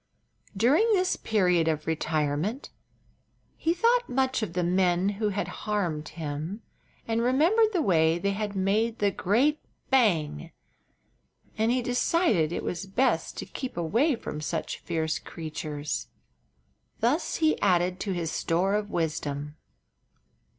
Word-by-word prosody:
During 295 - +4
this 370 -2 +2
period 180 -6 +2
of 155 -1 -1
retirement 155 - -1 0.8
he 325 - 0
thought 470 +7 +2
much 260 -1 +1
of 200 -6 -3
the 180 0 0
men 180 +1 +2
who 210 +1 -1
had 205 0 -2 0.2
harmed 170 -7 -1
him, 160 +6 -5 0.4
and 230 0 0
remembered 335 - +3
the 355 -6 +1
way 165 - +3
they 200 +3 0
had 205 0 -3
made 210 +4 +1
the 205 -1 +2
great 250 - +2 0.3
"bang!" 170 - +2 1.0
And 220 +2 +1
he 250 0 +1
decided 245 - +2
it - - -3
was 180 +2 -4
best 245 +8 0
to - - -4
keep 260 -9 -6
away 230 - +2
from 150 -9 -6
such 150 - -3
fierce 160 -2 -2
creatures. 155 -2 -5 0.9
Thus 255 +9 +1
he 315 -1 +1
added 180 -1 +2
to 200 - -2
his 170 -3 -2
store 180 +4 0
of 210 0 -1
wisdom. 150 -4 -3
195 Hz, 135 wpm, -27 LUFS, 165-245 Hz, 1.0 s, During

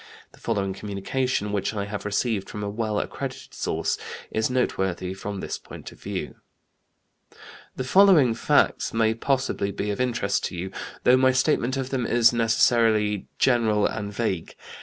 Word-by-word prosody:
The - - -19
following 100 -4 -1
communication 105 +3 -2
which 105 +1 -1
I 100 -1 -2
have 105 0 -6
received 105 -1 -1
from 105 - -5
a 100 - -2
well 110 -1 -1
accredited - - -6
source - - -2 0.3
is 110 +2 0
noteworthy 95 -7 -1
from 100 0 -6
this - - -4
point - - -10
of - - -18
view: - - -5 1.4
"The - - -3
following 160 - +5
facts 115 - +1
may 110 -1 +3
possibly 130 -3 -1
be 100 +1 -3
of 100 - -2
interest 120 -6 0
to - - -5
you, 90 +2 -5 0.3
though 125 +1 +6
my 130 0 +4
statement 130 -1 +1
of 135 -1 -3
them 125 -3 -1
is 120 0 +4
necessarily 115 -3 +2
general 115 -5 +3
and 100 -1 -3
vague. 95 -5 -3
110 Hz, 160 wpm, -25 LUFS, 100-125 Hz, 1.4 s, though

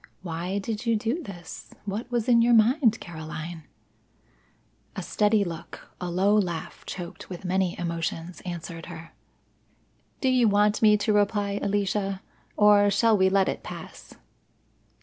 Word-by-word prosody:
Why 175 +2 -3
did 215 +3 -4
you 230 - +3
do 230 +9 -1
this? 175 - -10
What 210 +4 -4
was 240 -3 -1
in 235 -2 +5
your 235 0 +5
mind, 230 +1 +4
Caroline?" 160 -1 -7 1.3
A - - -4
steady 210 0 +2
look, 170 -3 -8
a 180 - -3
low 190 +4 +3
laugh 175 -6 -2
choked 175 -2 -7
with 180 0 -8
many 185 0 0
emotions 170 0 -4
answered 170 -2 -6
her. 165 -1 -9 1.1
"Do 265 - +1
you 250 -2 +4
want 210 +1 +3
me 210 -1 +6
to 210 +1 0
reply, 205 -1 +1
Alicia? 195 -1 -1 0.3
Or 205 -1 +6
shall 220 +2 +4
we 190 -1 +4
let 195 0 +3
it - - -2
pass?" - - -10
200 Hz, 145 wpm, -26 LUFS, 175-215 Hz, 1.3 s, me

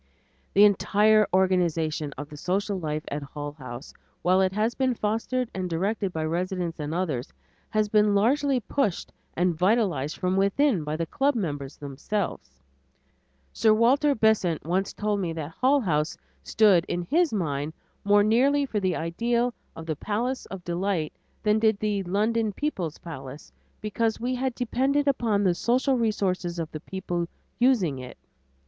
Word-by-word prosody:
The 200 - +7
entire 210 +1 +4
organization 170 -5 +1
of 145 - -6
the 150 - -11
social 195 +5 -1
life 155 -2 -3
at 145 - -3
Hull 145 +1 -6
House, 130 -2 -9 0.3
while 185 +2 +4
it 190 -1 +2
has 215 +4 0
been 260 -2 0
fostered 230 +4 -1
and 185 -1 -3
directed 195 +4 -1
by 160 -2 -2
residents 175 0 -2
and 150 0 -3
others, 160 -8 -2 0.4
has 215 -1 +1
been 210 -1 +3
largely 270 +6 +2
pushed 215 -7 -1 0.2
and 175 +1 +2
vitalized 180 - +1
from 185 0 0
within 200 - +2
by 150 +1 -3
the 165 - -1
club 275 - +1
members 145 - -3
themselves. 140 - -4 0.9
Sir 215 -1 +4
Walter 275 +6 +3
Besant 215 -8 +2
once 185 +4 0
told 210 -1 -1
me 175 -4 -2
that 160 -1 -5
Hull 270 - +2
House 155 -6 0 0.2
stood 205 -6 +4
in 175 - -2
his 330 - +2
mind 150 -7 -2 0.3
more 205 0 +5
nearly 270 +7 +3
for 220 -6 -2
the 185 -3 0
ideal 235 +9 0 0.2
of 165 - -8
the 160 -1 -2
"Palace 235 - -2
of 190 -2 -8
Delight" 175 -2 -1 0.3
than 210 0 +3
did 220 -2 +3
the 210 -2 0
"London 215 +3 0
People's 190 - -3
Palace" 140 -4 -9 0.3
because 220 +1 -1
we 245 +2 -1
had 255 -1 -2
depended 270 +4 0
upon 225 -7 +2
the 185 -3 +3
social 255 +8 +1
resources 190 -7 -1
of 165 -2 -4
the 155 - -6
people 175 0 -4 0.3
using 215 - +3
it. 125 -1 -9
195 Hz, 160 wpm, -26 LUFS, 165-225 Hz, 0.9 s, The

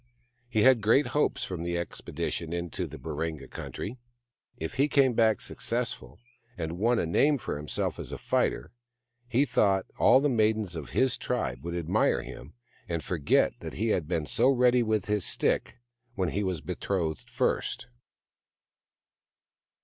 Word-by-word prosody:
He 110 -4 +2
had 130 -3 +6
great 115 +7 +4
hopes 150 - +1
from 90 -3 -4
the 85 0 -1
expedition 85 -1 -4
into 85 -1 -3
the - - -9
Baringa 75 0 -4
country. 120 +5 -6 0.6
If 80 - -4
he 140 +3 +2
came 135 -4 +4
back 110 -1 +3
successful, 120 +1 -4 0.4
and 85 0 -4
won 120 +3 +3
a - - +1
name 140 - +3
for - - -4
himself 75 +1 -3
as - - -6
a - - -4
fighter, - - 0 0.6
he 125 +3 +3
thought 95 -7 +2
that - - -31
all 130 - +7
the 145 - +2
maidens 110 -6 +1
of 75 -6 -6
his 130 - +1
tribe 60 +1 -2
would 85 +1 -4
admire 85 -2 +1
him, 70 +6 -10 0.3
and 85 -2 -2
forget 80 -6 +2
that - - -7
he 110 +2 -1
had 85 -7 0
been 80 -3 -1
so 120 - +3
ready 125 -2 +4
with 110 -4 0
his 105 -2 0
stick - - 0 0.4
when 95 -5 0
he 100 - -1
w^as 90 -6 -2
betrothed 90 -2 -2
first. 120 +1 -1
100 Hz, 160 wpm, -28 LUFS, 85-120 Hz, 0.6 s, all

